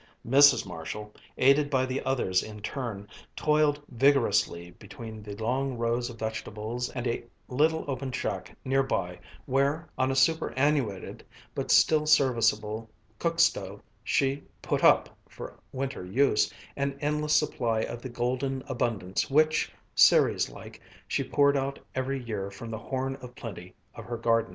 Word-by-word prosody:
Mrs. 140 +1 +6
Marshall, 95 +4 -7 0.2
aided 140 +2 +4
by 130 -2 +2
the 130 +1 -2
others 125 -9 +1
in 105 -1 -9
turn, 110 -6 -4 0.3
toiled 150 -1 +2
vigorously 115 -9 +2
between 110 +3 -10
the 105 -1 -8
long 125 +4 -1
rows 120 +1 0
of - - -10
vegetables 110 +2 -4
and 125 -1 -5
a 120 -1 -1 0.2
little 155 +5 +1
open 135 -1 -3
shack 95 -7 -4
near 135 +1 +3
by, 90 -9 -2 0.3
where, 140 +5 +1
on 130 - +2
a 135 - 0
superannuated 135 - +1 0.3
but - - -4
still 155 -1 +5
serviceable 115 -6 +2 0.3
cook - - -1
stove, - - +2 0.2
she 135 +1 +1 0.2
"put - - -1
up," - - +4
for - - -10
winter 135 -6 -4
use, 105 +4 +2 0.2
an 140 0 -2
endless 150 +1 0
supply 120 -7 +1
of 120 +1 -5
the 130 - -6
golden 130 +2 -2
abundance 115 -7 -1
which, 155 +2 +3 0.2
Ceres - - +5
like, - - -12 0.3
she - - 0
poured 140 0 +3
out 135 0 -1 0.2
every 130 +1 -2
year 105 -4 -4
from 115 +3 -9
the 110 - -4
Horn 135 +2 -3
of 125 -1 -11
Plenty 90 -5 -9 0.2
of - - -10
her 120 -1 -4
garden. 115 -1 +1
130 Hz, 150 wpm, -28 LUFS, 110-140 Hz, 0.3 s, Mrs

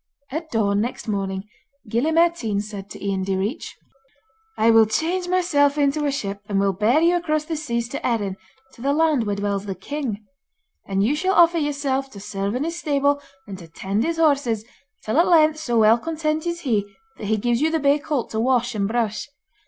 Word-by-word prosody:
At 315 +3 -4
dawn 205 -4 +1
next 240 +2 -4
morning 195 -2 -2 0.4
Gille 235 +9 0
Mairtean 330 -11 +2
said 205 -1 -7
to - - -9
Ian 195 -1 -1
Direach: 195 - -3 0.8
'I 225 +1 +4
will 225 -1 +6
change 340 - -1
myself 305 -6 +2
into 290 +1 +1
a - - +1
ship, 200 -7 -4
and 200 -1 +1
will 195 0 +2
bear 215 - +3
you 340 +1 +4
across 310 -3 0
the 320 - -3
seas 235 -6 -2
to 280 - -5
Erin, 205 -6 -1 0.4
to - - -15
the 280 +2 +1
land 305 -6 +2
where 205 - 0
dwells 200 0 -2
the 195 - -3
king. 220 - -5 0.6
And 195 0 +1
you 255 +8 +2
shall 375 +5 0
offer 340 -1 +5
yourself 280 -2 -1
to 200 - -9
serve 200 +1 -3
in 255 - -1
his 335 +2 -3
stable, 285 -1 +1 0.2
and 195 -2 -8
to 170 - -11
tend 195 +6 -2
his 330 0 -1
horses, 275 -9 +2 0.4
till 220 +8 +1
at 340 - +4
length 310 -3 +4
so 240 -6 -1
well 220 +1 +5
content 315 +1 -2
is 340 0 -3
he, 225 -9 +1 0.4
that - - -6
he 220 +1 +1
gives 240 +3 0
you 315 - +3
the 320 - +1
bay 285 -1 +3
colt 295 -4 -3
to 220 - -2
wash 245 0 +1
and 200 -2 0
brush. 225 0 -1
245 Hz, 205 wpm, -22 LUFS, 205-310 Hz, 0.8 s, will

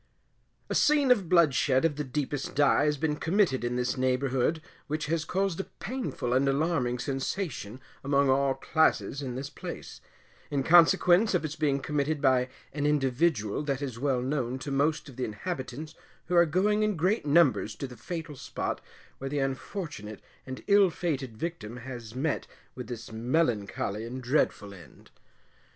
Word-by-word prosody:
A - - -3
scene 290 -3 +4
of 200 -9 +3
bloodshed 150 -4 +4
of 155 -3 +1
the 150 - -2
deepest 145 +1 -3
dye 145 0 +4
has 150 -1 +1
been 150 +1 -1
committed 165 - +1
in 120 0 -1
this 125 +1 -1
neighbourhood, 130 +3 +1 0.3
which 155 +1 -2
has 160 +1 0
caused 190 +2 -1
a 195 - -2
painful 235 - -3
and 135 +2 +3
alarming 135 -4 +1
sensation 135 - -3 0.2
among 140 0 +3
all 135 0 +3
classes 160 -3 +1
in 130 -3 -4
this 135 +2 -5
place, - - -8 0.5
in 140 -2 0
consequence 175 - +5
of 170 - 0
its 155 0 -4
being 145 -3 +1
committed 150 +1 -1
by 130 -2 +3 0.2
an 145 0 0
individual 135 -5 +1
that 140 -2 -2
is 125 -5 -5
well 130 -2 0
known 130 -2 -1
to 140 +2 -6
most 145 +3 +1
of 130 -3 -12
the 130 - -2
inhabitants 135 - -5 0.3
who 180 - -1
are 170 0 +6
going 205 +6 +2
in 215 -1 +1
great 185 +1 +1
numbers 140 -8 +3
to - - -5
the 125 -2 -9
fatal 155 - -6
spot 135 -1 -4 0.4
where 135 - -4
the 145 - -2
unfortunate 135 - -4 0.2
and 130 0 -7
ill 200 -2 +5
fated 135 -9 -3
victim 125 -7 -5
has 120 -2 -8
met 145 +3 -1 0.3
with 125 - -7
this 115 -2 -7
melancholy 110 -4 -1
and 125 +3 -6
dreadful 120 -6 0
end. 85 -8 -16
140 Hz, 165 wpm, -28 LUFS, 125-160 Hz, 0.5 s, are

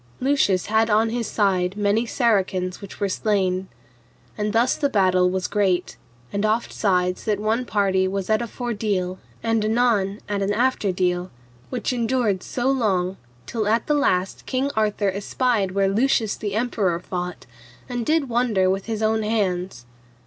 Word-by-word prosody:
Lucius 250 -9 +2
had 220 +2 +2
on 220 +1 +3
his 235 -2 -2
side 190 -3 +1
many 210 +3 +1
Saracens 190 -7 0
which 200 - -10
were 200 - +1
slain. 190 -2 0 0.7
And 210 0 -1
thus 235 +4 +2
the 285 - 0
battle 185 -4 +3
was 185 0 -2
great, 190 -4 0 0.4
and 200 0 -1
oftsides 195 -4 0
that 210 -2 0
one 220 +4 0
party 195 -4 +1
was 190 0 -3
at 215 0 +2
a 235 - -3
fordeal 205 -6 -2 0.2
and 225 -1 +1
anon 215 -3 +1
at 205 -1 -2
an 200 +1 +1
afterdeal, 185 -7 0 0.4
which - - -2
endured 230 -5 0
so 245 0 -3
long 195 -8 0 0.3
till 220 -3 -2
at 225 +2 +2
the 300 - +1
last 190 -10 0
King 265 +2 0
Arthur 210 -2 +1
espied 200 0 0
where 195 0 +2
Lucius 220 +1 +1
the 205 -2 -4
Emperor 215 -7 0
fought, 180 0 -5 0.4
and 245 -2 -3
did 310 +2 +1
wonder 230 -6 +2
with 195 +2 -3
his 220 -1 -2
own 220 0 +2
hands. 185 - -1
210 Hz, 155 wpm, -23 LUFS, 190-230 Hz, 0.7 s, on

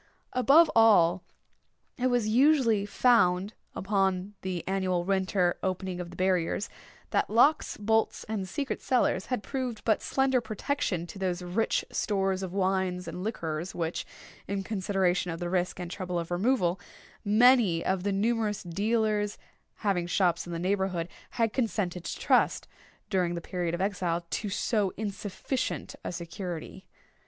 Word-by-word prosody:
Above 280 +6 +5
all, 195 -6 +5 0.8
it 255 - +2
was 245 -3 +1
usually 235 -4 +4
found, 200 -4 +3 0.2
upon 195 0 0
the 185 -3 -4
annual 185 -2 0
winter 190 -1 +1
opening 185 -1 -2
of 175 -1 -5
the 175 - -11
barriers, 185 +1 0 0.4
that - - +1
locks, 245 +8 +3
bolts, 220 +1 +1
and 205 -4 -4
secret 275 +6 -3
cellars, 240 -7 +1
had 250 -5 -2
proved 255 -5 -4
but 220 -2 +2
slender 265 -2 +1
protection 215 - -2
to 175 +3 -10
those 180 -1 -2
rich 185 +6 0
stores 195 -2 0
of 190 -2 -4
wines 190 -1 0
and 180 - -5
liquors 170 -5 -3
which, 165 0 -2 0.4
in 200 -1 -2
consideration 190 -3 0
of 165 0 -4
the 175 0 -3
risk 180 -1 0
and 175 -1 -5
trouble 180 -2 -3
of 170 0 -4
removal, 185 -2 +1 0.4
many 215 -5 +4
of 190 -1 +1
the 200 +2 -1
numerous 215 +1 0
dealers 210 +3 0 0.5
having 180 -4 +1
shops 175 -2 +1
in - - -6
the 170 - -3
neighbourhood 185 -1 -1 0.2
had 230 -2 0
consented 205 -8 -1
to - - -4
trust, - - +2 0.4
during 180 -3 +1
the - - -2
period 175 0 -3
of 175 - -4
exile, 180 -4 -1
to 210 - -2
so 205 -1 0
insufficient 205 +4 -3
a - - -3
security. 175 +1 -6
190 Hz, 145 wpm, -28 LUFS, 180-220 Hz, 0.8 s, Above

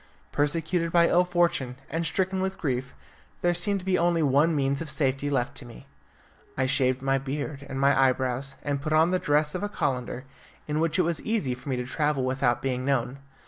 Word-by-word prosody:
Persecuted 165 +3 0
by 170 0 +5
ill 180 - +4
fortune, 175 -8 0
and 165 +2 -2
stricken 190 +3 0
with 190 0 -2
grief, 130 -5 -3 0.5
there 175 0 +2
seemed 195 +3 +1
to - - -12
be 185 -1 +2
only 170 -1 +2
one 145 +4 +3
means 140 0 0
of 165 - -5
safety 140 -1 0
left 130 -4 0
to - - -6
me. 120 +2 -12 0.7
I 130 - +2
shaved 130 0 +1
my 135 0 +2
beard 140 +1 -5
and 135 - -4
my 135 -1 +4
eyebrows, 130 +1 -2
and 140 -1 -2
put 155 +1 -2
on 160 +3 +4
the 185 - +2
dress 150 -1 +1
of 180 - -3
a 205 - -2
calender, 125 -7 -2 0.4
in 150 0 -1
which 165 -1 +1
it 180 - +4
was 170 -1 -1
easy 210 - -1
for 130 +3 -9
me 130 - 0
to 125 0 -3
travel 150 0 0
without 130 -1 0
being 130 -1 -1
known. 135 0 -1
145 Hz, 210 wpm, -26 LUFS, 130-170 Hz, 0.7 s, by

